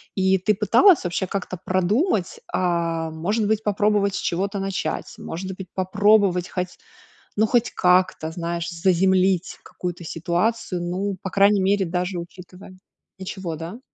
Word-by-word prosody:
И 190 0 +3
ты 200 +3 +1
пыталась 230 - +5
вообще 180 +2 -2
как-то 185 -1 -4
продумать, 185 - 0
а 170 -2 0
может 200 +8 -1
быть, 220 0 0
попробовать 205 -1 +1
с - - -2
чего-то 195 +4 -1
начать, 195 -4 -3
может 185 +3 -6
быть, 190 - -8
попробовать 195 -1 +3
хоть, 180 -1 -4 0.6
ну, 220 - +3
хоть 240 +1 +2
как-то, 180 -3 +2
знаешь, 170 +1 -3
заземлить 185 +1 +2
какую-то 175 -1 -6
ситуацию, 175 +4 -1
ну, 190 +3 -2
по 195 - -4
крайней 200 +1 +4
мере, 195 0 +2
даже 180 +2 -2
учитывая 180 +2 -12 0.4
Ничего, 190 -3 -5
да? 165 +8 -7
185 Hz, 140 wpm, -23 LUFS, 175-200 Hz, 0.6 s, пыталась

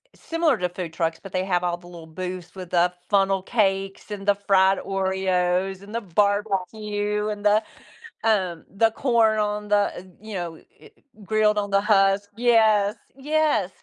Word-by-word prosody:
similar 330 -6 0
to 180 - -1
food 175 -2 -6
trucks, 165 0 -2
but 195 - -10
they 185 0 0
have 180 -2 0
all 175 -1 -1
the 175 - -19
little 170 -2 -11
booths 180 +2 -7
with 185 -2 -9
the 175 0 +3 0.2
funnel 195 -1 +2
cakes, 195 -2 -1
and 200 -1 -6
the 205 - +6
fried 195 -1 +3
Oreos, 190 0 -1
and 205 +2 -12
the 230 - -2
barbecue, 205 +2 -1
and 210 0 -5
the, 210 +1 +5 0.6
um, 185 -7 0
the 225 +3 +3
corn 225 -3 +2
on 210 0 -2
the 205 - +4 0.2
uh, - - -7 0.2
you 215 0 -9
know, 175 -2 -4
eh - - -19 0.3
eh, - - -20 0.4
grilled 215 +1 +2
on 205 - -3
the 200 - +4
husk. 200 -1 +3
Yes. 220 -3 +3 0.2
Yes. 295 -8 +1
200 Hz, 175 wpm, -24 LUFS, 185-210 Hz, 0.6 s, the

